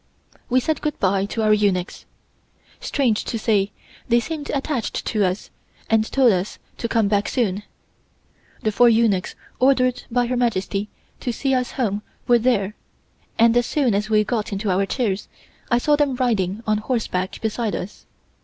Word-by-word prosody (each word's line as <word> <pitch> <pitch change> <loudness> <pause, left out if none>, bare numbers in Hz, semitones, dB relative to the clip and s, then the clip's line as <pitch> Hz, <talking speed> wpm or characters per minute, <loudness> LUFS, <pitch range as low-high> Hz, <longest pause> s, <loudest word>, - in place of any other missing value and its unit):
We 255 +1 +4
said 310 +5 -1
good 300 -2 -2
bye 195 0 +2
to 220 +1 -2
our 215 0 +5
eunuchs. 200 -4 0 0.7
Strange 245 -7 0
to 230 - -2
say 210 -3 +1 0.4
they 235 0 +5
seemed 300 +3 -5
attached 275 -3 -2
to 215 -3 +1
us 185 +1 -2 0.4
and 220 0 +2
told 260 -4 +5
us 185 +1 -2 0.2
to 235 - -1
come 225 -2 +2
back 205 0 +1
soon. 210 -6 0 1.0
The 215 - +1
four 240 +3 +5
eunuchs 220 -5 +2 0.2
ordered 255 -1 +3
by 245 0 +1
Her 250 +1 -1
Majesty 210 -3 -1 0.3
to 245 - -2
see 270 +4 -1
us 255 -1 0
home 210 -5 -1 0.3
were 240 -1 +5
there, 215 -5 +1 0.6
and 230 0 +5
as 240 0 +3
soon 270 -7 +1
as 210 +2 -1
we 215 -1 +4
got 220 -1 -2
into 200 0 -1
our 195 +2 +1
chairs 210 -6 -1 0.4
I 240 - +4
saw 295 +5 +3
them 290 -3 +1
riding 220 -5 0
on 215 -1 +1
horseback 210 -6 -2
beside 220 0 -2
us. 195 - -7
225 Hz, 170 wpm, -22 LUFS, 205-250 Hz, 1.0 s, our